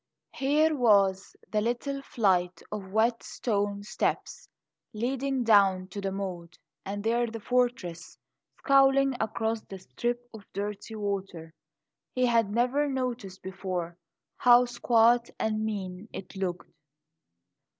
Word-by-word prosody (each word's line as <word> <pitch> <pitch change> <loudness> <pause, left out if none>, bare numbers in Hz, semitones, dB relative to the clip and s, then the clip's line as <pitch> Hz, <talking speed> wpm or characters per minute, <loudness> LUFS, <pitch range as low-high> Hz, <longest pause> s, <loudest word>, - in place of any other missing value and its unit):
Here 300 +3 +2
was 200 -6 +3 0.2
the 210 0 +1
little 245 +5 -2
flight 185 -9 0
of 200 -3 -6
wet 230 +3 +2
stone 205 -3 -2
steps 210 - -3 0.4
leading 260 +3 -1
down 195 -4 +4
to 200 +2 -6
the 195 -1 -2
moat; 180 -3 -6 0.3
and 200 +1 -5
there 235 +2 +1
the 225 0 -6
fortress 240 -8 -1 0.4
scowling 275 0 +4
across 220 0 -1
the 195 - -10
strip 240 +6 -4
of 215 -3 -13
dirty 205 +2 -5
water. 195 -6 -4 0.6
He 255 0 +3
had 230 -4 +3
never 250 +7 +1
noticed 245 -8 -4
before 185 -2 -4 0.4
how 245 0 +6
squat 240 0 +3
and 215 0 0
mean 200 -1 -4
it 190 - -9
looked. 185 -2 -4
215 Hz, 120 wpm, -28 LUFS, 195-245 Hz, 0.6 s, how